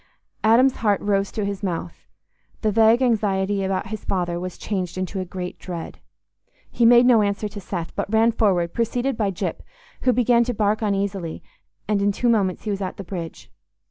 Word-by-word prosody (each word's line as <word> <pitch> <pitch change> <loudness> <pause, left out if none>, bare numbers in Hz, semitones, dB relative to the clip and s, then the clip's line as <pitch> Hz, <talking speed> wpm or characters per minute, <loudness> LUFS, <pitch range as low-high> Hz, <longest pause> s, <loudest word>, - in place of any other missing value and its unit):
Adam's 245 +4 +4
heart 205 -3 +1
rose 200 -1 0
to 210 - -2
his 200 -1 -4
mouth: 175 -3 -5 0.6
the 215 - +2
vague 225 +4 +4
anxiety 205 -4 +1
about 190 0 -2
his 215 -1 -6
father 175 -2 -1
was 180 0 -6
changed 185 -4 -3
into 185 +1 -3
a 185 - -3
great 180 0 -6
dread. 175 -3 -7 0.7
He 235 - +3
made 240 +1 +7
no 240 -3 +6
answer 205 +1 -1
to 205 -1 -8
Seth, 175 -3 -5
but - - -3
ran 225 +1 +4
forward 185 -7 +1
preceded 245 +3 -1
by 215 -3 0
Gyp, 185 - -3 0.4
who 255 - +3
began 240 -1 +3
to 245 -1 -2
bark 210 +1 +1
uneasily; 195 -5 -2 0.4
and 205 -1 +1
in 205 0 +3
two 240 +4 0
moments 200 -5 +1
he 215 - -2
was 200 0 -3
at 185 - -4
the 195 - -6
bridge. 170 -3 -7
200 Hz, 190 wpm, -23 LUFS, 185-225 Hz, 0.7 s, made